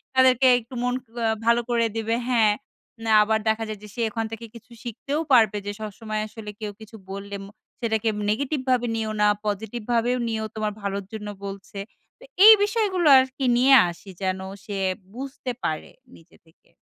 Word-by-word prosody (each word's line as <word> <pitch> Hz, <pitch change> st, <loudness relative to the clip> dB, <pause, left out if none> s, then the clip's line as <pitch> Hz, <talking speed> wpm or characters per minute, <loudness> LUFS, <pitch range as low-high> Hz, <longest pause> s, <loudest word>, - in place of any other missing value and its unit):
তাদেরকে 260 Hz, 0 st, +5 dB
একটু 235 Hz, +3 st, -15 dB
মন 250 Hz, 0 st, +1 dB, 0.3 s
আ -, -, +2 dB, 0.2 s
ভালো 235 Hz, +1 st, +4 dB
করে 235 Hz, -1 st, +2 dB
দেবে, 225 Hz, +1 st, 0 dB
হ্যাঁ। 220 Hz, -4 st, +4 dB, 0.5 s
না 220 Hz, -, +1 dB
আবার 220 Hz, +1 st, +1 dB
দেখা 220 Hz, +1 st, 0 dB
যায় 215 Hz, -2 st, -5 dB
যে -, -, -9 dB
সে 235 Hz, -, -3 dB
ওখান 225 Hz, 0 st, -2 dB
থেকে 230 Hz, +1 st, -7 dB
কিছু 230 Hz, +1 st, -14 dB
শিখতেও 275 Hz, +6 st, -3 dB
পারবে 220 Hz, -4 st, +5 dB
যে 205 Hz, -, -2 dB
সবসময় 215 Hz, 0 st, -4 dB
আসলে 215 Hz, -1 st, -9 dB
কেউ 210 Hz, -1 st, -3 dB
কিছু 220 Hz, +1 st, -12 dB, 0.2 s
বললে 200 Hz, +1 st, -6 dB
ম -, -, -11 dB, 0.3 s
সেটাকে 220 Hz, -1 st, 0 dB, 0.2 s
নেগেটিভ 280 Hz, +6 st, 0 dB
ভাবে 245 Hz, -1 st, +2 dB
নিও 220 Hz, -1 st, -2 dB
না, 210 Hz, -, +5 dB, 0.2 s
পজিটিভ 215 Hz, +3 st, -3 dB
ভাবেও 240 Hz, +2 st, +2 dB
নিও 220 Hz, -1 st, -2 dB
তোমার 215 Hz, -1 st, -2 dB
ভালোর 200 Hz, -1 st, -3 dB
জন্য 210 Hz, -1 st, -6 dB, 0.2 s
বলছে। 195 Hz, 0 st, -8 dB, 0.4 s
তো -, -, -16 dB, 0.2 s
এই 440 Hz, -, +12 dB
বিষয়গুলো 405 Hz, -6 st, +1 dB
আর 260 Hz, -, +5 dB
কি 270 Hz, -, -1 dB
নিয়ে 265 Hz, +2 st, +5 dB, 0.2 s
আসি 175 Hz, +3 st, -11 dB
যেন 185 Hz, 0 st, -1 dB, 0.3 s
সে 205 Hz, -2 st, -4 dB, 0.4 s
বুঝতে 265 Hz, -1 st, -5 dB
পারে 155 Hz, -, -3 dB, 0.2 s
নিজে 165 Hz, -, -20 dB
থেকে। 160 Hz, -, -28 dB
225 Hz, 180 wpm, -24 LUFS, 210-245 Hz, 0.5 s, এই